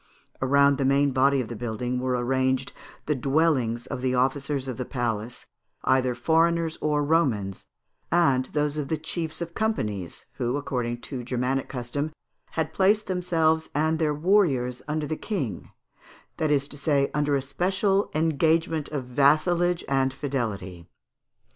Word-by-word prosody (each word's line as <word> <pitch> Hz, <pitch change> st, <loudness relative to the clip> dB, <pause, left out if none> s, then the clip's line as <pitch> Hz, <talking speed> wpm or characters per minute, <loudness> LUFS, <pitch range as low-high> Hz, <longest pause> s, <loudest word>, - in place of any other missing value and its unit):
Around 140 Hz, +1 st, +4 dB
the -, -, +1 dB
main 140 Hz, +1 st, +3 dB
body 135 Hz, +1 st, +3 dB
of 120 Hz, -, -5 dB
the 120 Hz, -, -6 dB
building 120 Hz, +2 st, -3 dB
were 125 Hz, 0 st, 0 dB
arranged 130 Hz, +1 st, 0 dB, 0.3 s
the 150 Hz, -, +1 dB
dwellings 135 Hz, -4 st, +1 dB
of 125 Hz, -, -5 dB
the 130 Hz, 0 st, 0 dB
officers 135 Hz, +1 st, 0 dB
of 130 Hz, -, -4 dB
the 130 Hz, -, -2 dB
palace, 120 Hz, -3 st, -3 dB, 0.4 s
either 130 Hz, -1 st, +2 dB
foreigners 165 Hz, +3 st, +2 dB
or 150 Hz, -1 st, +1 dB
Romans, 125 Hz, -, 0 dB, 0.4 s
and 135 Hz, -7 st, +3 dB
those 150 Hz, +1 st, -1 dB
of 145 Hz, -2 st, -2 dB
the 160 Hz, -, -1 dB
chiefs 160 Hz, +1 st, -4 dB
of 170 Hz, 0 st, -9 dB
companies, 105 Hz, -, -2 dB
who, 120 Hz, +3 st, 0 dB
according 120 Hz, -4 st, -3 dB
to 130 Hz, -4 st, -6 dB
Germanic 125 Hz, +2 st, -1 dB
custom, 140 Hz, +4 st, -3 dB, 0.4 s
had 160 Hz, -1 st, -2 dB
placed 205 Hz, +4 st, +3 dB
themselves 165 Hz, -4 st, +1 dB
and 160 Hz, +2 st, +1 dB
their 150 Hz, -2 st, +1 dB
warriors 145 Hz, -8 st, +2 dB
under 155 Hz, 0 st, -1 dB
the 155 Hz, -, -2 dB
King, 135 Hz, -, -4 dB, 0.7 s
that 155 Hz, -, 0 dB
is 140 Hz, -1 st, +2 dB
to 145 Hz, -, -8 dB
say, 140 Hz, -1 st, +1 dB
under 145 Hz, -1 st, +1 dB
a 135 Hz, -, +1 dB
special 195 Hz, +7 st, +1 dB
engagement 160 Hz, 0 st, +1 dB
of 145 Hz, -3 st, -3 dB
vassalage 165 Hz, +7 st, +2 dB
and 135 Hz, -1 st, +2 dB
fidelity. 105 Hz, -, -4 dB
140 Hz, 150 wpm, -26 LUFS, 125-160 Hz, 0.7 s, Around